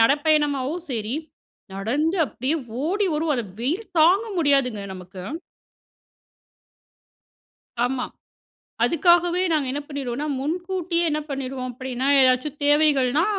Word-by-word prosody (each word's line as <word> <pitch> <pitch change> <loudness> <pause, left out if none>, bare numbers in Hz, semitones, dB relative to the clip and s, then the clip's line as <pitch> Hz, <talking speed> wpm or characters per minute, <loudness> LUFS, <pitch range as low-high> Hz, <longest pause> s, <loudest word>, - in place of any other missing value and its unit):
நடப்பயணமாவோ 290 +2 +2 0.2
சரி, 225 -1 -2 0.6
நடந்து 275 - 0
அப்டியே 265 +5 -1 0.3
ஓடி 395 +5 +1
வருவோம். 305 0 +1
அந்த 235 -3 -3
வெயில் 320 - -1
தாங்க 360 +7 +5
முடியாதுங்க, 275 -8 +2
நமக்கு. 185 0 -10 2.6
ஆமா. 250 0 -1 0.8
அதுக்காகவே 345 +1 +4
நாங்க 295 -4 +1
என்ன 290 +2 -3
பண்ணிருவோனா 280 -1 -4
முன்கூட்டியே 345 +3 -1
என்ன 305 0 0
பண்ணிருவோம் 265 -2 -4
அப்டின்னா, 255 +1 -4
எதாச்சும் 260 +3 +2
தேவைகள்னா, 290 -1 +3
285 Hz, 100 wpm, -23 LUFS, 255-320 Hz, 2.6 s, தாங்க